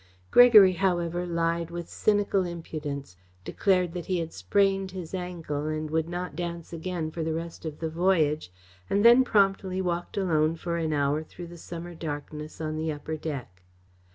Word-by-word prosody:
Gregory, 220 -6 +9
however, 175 -1 0
lied 170 0 0
with 170 0 -6
cynical 205 -2 +1
impudence, 150 - -6 0.3
declared 180 - +1
that 175 -2 -5
he 185 - 0
had 165 -1 -4
sprained 195 -1 +1
his 185 -3 -8
ankle 170 -5 -4
and 155 0 -3
would 160 +1 0
not 180 +1 -4
dance 170 -1 -5
again 165 -1 -3
for 165 0 -4
the 160 0 -1
rest 165 0 -6
of 155 -2 -5
the 165 - -3
voyage, 160 - +1 0.4
and 205 +2 +2
then 240 +2 +8
promptly 195 -4 +2
walked 175 -1 -2
alone 160 -4 +2
for 170 +1 -3
an 160 -2 -1
hour 145 0 +1
through 170 +2 -10
the 170 0 -11
summer 170 +1 -8
darkness 150 -1 -6
on 155 -1 -3
the 160 0 -1
upper 155 +1 -5
deck. 140 - -6
170 Hz, 170 wpm, -27 LUFS, 155-180 Hz, 0.4 s, Gregory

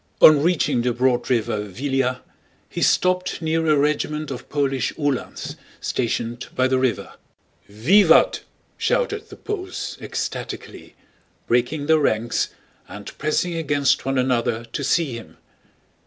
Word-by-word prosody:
On 150 -2 +8
reaching 165 -7 +2
the 120 0 0
broad 125 0 +1
river 115 -4 +1
Víliya, 130 +5 -2 0.5
he - - -6
stopped 185 0 +2
near 160 0 0
a 155 -1 +4
regiment 150 +1 0
of 130 0 -7
Polish 135 -3 0
Uhlans 145 -4 -3 0.2
stationed 120 0 -2
by 130 0 +3
the 130 0 +1
river. 125 -7 -1 0.6
"Vivat!" 160 - +4 0.4
shouted 455 -3 0
the - - -10
Poles, 375 -3 -5
ecstatically, - - -6 0.5
breaking 125 +5 0
their 160 +1 +4
ranks 115 -4 0 0.4
and 105 0 -9
pressing 155 +4 0
against 145 -4 +1
one 135 0 -1
another 120 -2 0
to 140 - -2
see 150 -1 +1
him. 115 - -11
135 Hz, 125 wpm, -22 LUFS, 120-160 Hz, 0.6 s, On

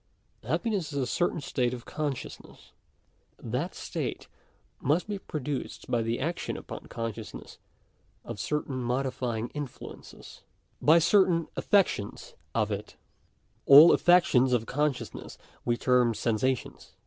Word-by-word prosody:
Happiness 200 -9 -1
is 140 - -4
a 135 - +1
certain 170 +5 0
state 125 -2 -1
of 120 - -11
consciousness. 145 -4 -6 0.7
That - - -3
state - - -4 0.5
must 155 +9 +1
be 205 -2 -3
produced 150 -6 -5
by 120 - +2
the 115 +1 -1
action 165 +5 -3
upon - - -9
consciousness 115 -2 -7 0.7
of - - -7
certain 150 +1 -2
modifying 125 -2 -2
influences 145 -4 -9 0.2
— - - -42
by 165 - +8
certain 170 -2 +3
affections 185 - 0 0.2
of 110 -2 +1
it 105 +1 -5 0.7
All 145 +5 +10
affec 175 0 +5
tions 125 0 +3
of 115 -2 +1
consciousness 145 +1 -3 0.3
we 120 -1 +1
term 125 -2 +3
sensations. 120 +3 -2
130 Hz, 125 wpm, -28 LUFS, 120-155 Hz, 0.7 s, All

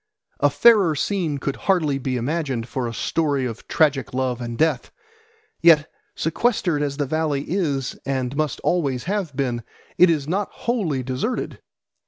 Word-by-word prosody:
A - - +4
fairer 205 -9 +5
scene 165 -2 -1
could 140 0 -3
hardly 155 -8 +1
be 130 -1 -2
imagined 130 -2 -2
for 125 0 -3
a - - -4
story 145 -5 0
of 115 -2 -6
tragic 140 -5 +1
love 130 -2 -1
and 120 -1 -5
death. 155 -5 +1 0.7
Yet, 160 -3 +6 0.3
sequestered 175 -2 0
as 140 -1 -2
the 145 - 0
valley 150 -1 -1
is 145 -8 -1
and 130 -1 -2
must 155 -1 -1
always 140 -8 0
have 185 -5 -2
been, 125 -4 -1 0.4
it 180 - +8
is 150 -4 0
not 195 +5 -1
wholly 185 - -1
deserted. 130 - -3
145 Hz, 155 wpm, -22 LUFS, 130-170 Hz, 0.7 s, it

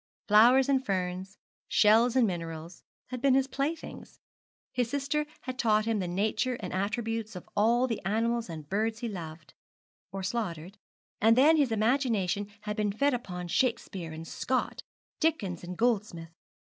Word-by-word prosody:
Flowers 240 +5 +6
and 270 -1 +2
ferns, 185 -2 -3 0.3
shells 225 +3 +4
and 255 -3 +5
minerals, 165 -2 -5 0.3
had 250 -1 -5
been 270 -1 +4
his 270 -1 +3
playthings. 280 +4 -5 0.5
His 245 -2 0
sister 285 +3 -1
had 255 -1 -6
taught 215 -3 +3
him 225 -2 0
the 185 - -2
nature 215 +7 0
and - - -6
attributes 215 +2 -2
of 180 - -9
all 235 +4 +3
the 230 -4 -3
animals 225 +3 0
and 155 -3 -7
birds 220 - -1
he 240 - -2
loved, 165 -6 -8 0.6
or 195 0 -5
slaughtered; 190 -3 -4 0.4
and 225 +2 +5
then 300 +5 +6
his 285 -6 +2
imagination 215 -4 +1
had 210 0 -4
been 210 -2 0
fed 280 +7 +1
upon 180 -7 -4
Shakespeare 200 -6 -1
and 160 +1 -8
Scott, 255 +8 -2 0.4
Dickens 215 - 0
and 180 0 -7
Goldsmith. 210 -8 0
215 Hz, 155 wpm, -29 LUFS, 185-250 Hz, 0.6 s, Flowers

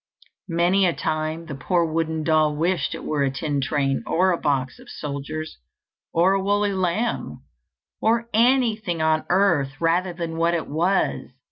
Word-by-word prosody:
Many 175 +3 +3
a 170 - +1
time 155 +2 -2
the 155 - -7
poor 170 +5 0
wooden 160 0 -1
doll 155 -1 +2
wished 165 0 0
it - - -8
were 150 -2 -1
a 140 - +2
tin 140 +1 -2
train, 135 -1 0
or 185 +2 +2
a 175 - +1
box 135 -4 -1
of - - -15
soldiers, 150 +2 -6 0.5
or 175 +3 +3
a 195 - +1
woolly 205 0 +1
lamb, 190 +5 -2 0.6
or 230 +1 +2
anything 225 -6 +2
on 155 0 +1
earth 165 -8 +2
rather 175 +2 +1
than 170 -1 -5
what 170 +1 +2
it 165 - -2
was. 175 +6 0
165 Hz, 160 wpm, -23 LUFS, 155-185 Hz, 0.6 s, Many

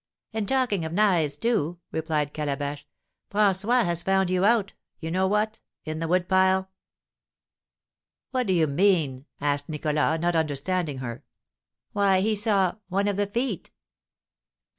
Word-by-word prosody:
"And 220 -2 -2
talking 250 -9 +1
of 160 0 -4
knives, 175 -7 +2
too," 175 -8 0
replied 155 -2 -1
Calabash, 145 -1 -3 0.4
"François 210 +4 +2
has 170 -1 0
found 190 0 +1
out 200 +3 +2 0.3
you 160 0 -5
know 190 +2 +2
what 210 +2 0 0.3
in 155 0 -4
the 165 - -2
wood 180 +1 +1
pile!" 190 0 +3 1.6
"What 255 -3 0
do 190 - +2
you 165 -3 +3
mean?" 150 -4 +1
asked 145 0 -1
Nicholas, 150 +1 0
not 175 +1 0
understanding 155 0 0
her. 120 -3 -6 0.7
"Why, 195 -2 +3
he 215 +2 +1
saw 200 -3 +1
one 200 +2 +1
of 205 - 0
the 205 +1 0
feet!" 230 -2 -2
185 Hz, 140 wpm, -26 LUFS, 155-200 Hz, 1.6 s, pile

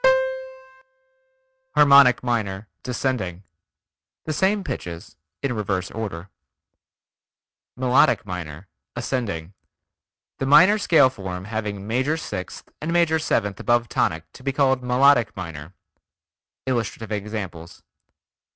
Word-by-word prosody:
Harmonic 140 -4 +7
Minor 105 -4 -2
(descending) 120 -8 -3 0.8
Same 190 +6 +1
pitches 85 - -6 0.3
in 135 -3 0
reverse 100 -4 -2
order. 100 -6 -5 1.5
Melodic 125 -2 +3
Minor 90 -1 -7 0.3
(ascending) 110 -9 -3 0.9
The 135 - -1
minor 185 +9 +6
scale 160 -9 +5
form 95 -5 -6
having 105 -2 -4
major 130 +8 0
sixth 90 -12 -6
and 155 - -3
major 170 -2 +3
seventh 105 - -1
above 120 -1 +1
tonic 80 0 0
to - - -14
be 135 - -1
called 135 -2 +2
Melodic 125 -1 +3
Minor. 85 -1 -8 0.9
Illustrative 115 -3 -3
examples. 100 -5 -6
115 Hz, 95 wpm, -23 LUFS, 95-135 Hz, 1.5 s, Harmonic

